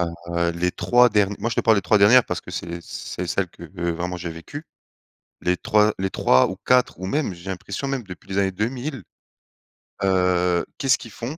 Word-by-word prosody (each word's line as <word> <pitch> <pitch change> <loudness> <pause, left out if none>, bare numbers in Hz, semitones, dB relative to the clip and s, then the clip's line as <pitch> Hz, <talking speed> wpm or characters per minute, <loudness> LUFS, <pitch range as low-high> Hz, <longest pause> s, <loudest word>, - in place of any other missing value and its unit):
heu, 85 0 -2
les 90 +1 0
3 125 +5 +4
dern 105 -2 +2
moi 115 - -2
je - - -4
te - - +3
parle 110 -1 +4
des 100 - 0
3 105 - +3
dernières 115 +5 +7
parce - - -3
que - - -11
c'est 85 +1 -5
c - - -18
c'est 90 - -6
celle 95 +1 -1
que 85 - -13 0.3
vraiment 90 +2 -3
j'ai 90 -1 -5
vécue, 85 - -9 0.8
les 90 0 +1
3 105 +3 +2
les 95 0 -1
3 65 -7 +3
ou 95 - -5
4 125 -6 +3
ou 95 - -5
même 140 -2 -1
j'ai 85 +3 -8
l'impression 95 +7 -5
même 135 -2 -2
depuis 95 -2 -12
les 95 - -1
années 95 -1 +2
2000, 120 - -3 1.0
heu, 90 -2 +2
qu'est-ce 135 -1 +3
qu'ils 115 - -11
font? 120 - -6
95 Hz, 210 wpm, -23 LUFS, 90-115 Hz, 1.0 s, dernières